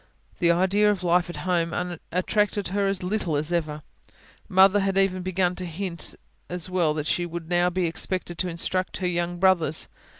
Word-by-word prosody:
The 170 Hz, -, +3 dB
idea 190 Hz, +4 st, +3 dB
of 200 Hz, -3 st, -1 dB
life 175 Hz, 0 st, +2 dB
at 175 Hz, -, -6 dB
home 175 Hz, 0 st, -1 dB, 0.2 s
attracted 205 Hz, +2 st, 0 dB
her 200 Hz, +1 st, 0 dB
as 195 Hz, -2 st, -1 dB
little 180 Hz, -5 st, -1 dB
as 155 Hz, +3 st, -3 dB
ever 155 Hz, -3 st, -2 dB, 0.7 s
Mother 190 Hz, +2 st, +6 dB
had 195 Hz, -1 st, 0 dB
even 190 Hz, -1 st, +2 dB
begun 180 Hz, 0 st, 0 dB
to 185 Hz, -, -4 dB
hint 175 Hz, +1 st, -2 dB, 0.3 s
as 180 Hz, +1 st, -4 dB
well 170 Hz, -4 st, +2 dB
that 150 Hz, -1 st, -3 dB
she 175 Hz, +3 st, 0 dB
would 170 Hz, -1 st, -6 dB
now 175 Hz, 0 st, +3 dB
be 180 Hz, 0 st, -1 dB
expected 175 Hz, +1 st, -3 dB
to 185 Hz, -, 0 dB
instruct 185 Hz, +2 st, -1 dB
her 185 Hz, -, -1 dB
young 175 Hz, 0 st, -1 dB
brothers. 175 Hz, -5 st, +2 dB
180 Hz, 185 wpm, -25 LUFS, 170-190 Hz, 0.7 s, Mother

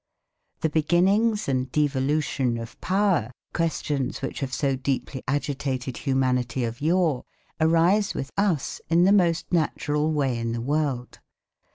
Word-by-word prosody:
The 160 Hz, -, +1 dB
beginnings 190 Hz, +8 st, +2 dB
and 130 Hz, -1 st, -1 dB
devolution 140 Hz, -3 st, 0 dB
of 115 Hz, 0 st, -9 dB
power, 185 Hz, -, +1 dB, 0.2 s
questions 145 Hz, -6 st, -1 dB
which 135 Hz, -, -3 dB
have 135 Hz, -2 st, -3 dB
so 135 Hz, +1 st, 0 dB
deeply 130 Hz, 0 st, -3 dB
agitated 135 Hz, -2 st, -2 dB
humanity 130 Hz, -2 st, 0 dB
of 115 Hz, +3 st, -4 dB
yore, 160 Hz, -4 st, +2 dB, 0.4 s
arise 170 Hz, +6 st, +3 dB
with 135 Hz, -, -4 dB
us 195 Hz, -9 st, 0 dB
in 170 Hz, +1 st, +4 dB
the 190 Hz, -, +5 dB
most 175 Hz, -4 st, +2 dB
natural 155 Hz, -2 st, +1 dB
way 135 Hz, -6 st, 0 dB
in 115 Hz, 0 st, -2 dB
the 115 Hz, -, -2 dB
world. 140 Hz, -2 st, -2 dB
145 Hz, 135 wpm, -25 LUFS, 130-165 Hz, 0.4 s, the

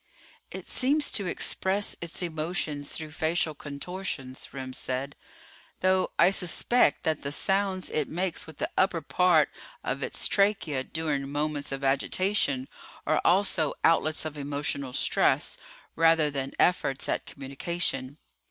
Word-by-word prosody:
"It -, -, -7 dB
seems 290 Hz, +3 st, +2 dB
to 200 Hz, -3 st, -1 dB
express 190 Hz, +3 st, 0 dB
its 170 Hz, +1 st, -5 dB
emotions 155 Hz, -3 st, -2 dB
through 155 Hz, -1 st, -6 dB
facial 160 Hz, +1 st, 0 dB
contortions," 145 Hz, -2 st, -5 dB
Remm 130 Hz, -1 st, -6 dB
said. 130 Hz, +2 st, -3 dB, 0.7 s
"Though 185 Hz, 0 st, +3 dB
I 185 Hz, -, +6 dB
suspect 195 Hz, +6 st, +2 dB
that 160 Hz, -2 st, 0 dB
the 140 Hz, -, -4 dB
sounds 190 Hz, +3 st, +1 dB
it 150 Hz, -2 st, 0 dB
makes 180 Hz, 0 st, -2 dB
with 160 Hz, -2 st, -11 dB
the -, -, -2 dB
upper 185 Hz, -3 st, +2 dB
part 180 Hz, +2 st, +3 dB, 0.3 s
of -, -, -2 dB
its -, -, 0 dB
trachea 195 Hz, -10 st, +1 dB
during 145 Hz, -3 st, -2 dB
moments 145 Hz, -1 st, -2 dB
of 135 Hz, 0 st, -4 dB
agitation 140 Hz, 0 st, +1 dB, 0.4 s
are -, -, +2 dB
also 175 Hz, -4 st, +2 dB
outlets 160 Hz, -1 st, +3 dB
of 150 Hz, -1 st, -5 dB
emotional 140 Hz, -2 st, -2 dB
stress, -, -, +2 dB, 0.4 s
rather 165 Hz, -2 st, +4 dB
than 135 Hz, -1 st, -3 dB
efforts 140 Hz, -6 st, +2 dB
at -, -, -2 dB
communication." 140 Hz, 0 st, -3 dB
155 Hz, 135 wpm, -28 LUFS, 140-180 Hz, 0.7 s, I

